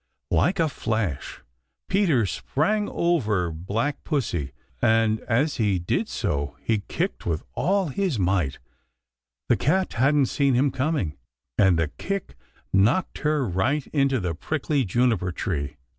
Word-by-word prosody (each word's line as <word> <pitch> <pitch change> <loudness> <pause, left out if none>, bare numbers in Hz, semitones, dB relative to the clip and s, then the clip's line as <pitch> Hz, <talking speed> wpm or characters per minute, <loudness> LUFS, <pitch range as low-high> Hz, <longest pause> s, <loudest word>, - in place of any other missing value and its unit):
Like 105 - +2
a 165 - +4
flash 110 - -3 0.4
Peter 175 - +3
sprang 185 - 0
over 110 - +1
Black 105 - -2
Pussy, 90 - -1 0.3
and 110 -1 +3
as 140 +6 +2
he 105 -5 +2
did 85 - -1
so 70 0 -2
he 110 -2 +1
kicked - - -2
with 80 -2 -1
all 195 -2 +1
his 180 - -1
might. 90 -7 +1 0.9
The - - +3
cat 190 0 +1
hadn't 140 +3 +3
seen 135 0 +1
him 135 +3 +3
coming, 130 - -1 0.4
and 95 -4 +4
the 80 -2 +1
kick 195 -1 -3 0.4
knocked 110 - +2
her 150 -4 +1
right 120 - 0
into 135 -3 +2
the 90 -4 -2
prickly 145 - -1
juniper 105 -3 +1
tree. 75 -6 -3
115 Hz, 135 wpm, -25 LUFS, 90-150 Hz, 0.9 s, a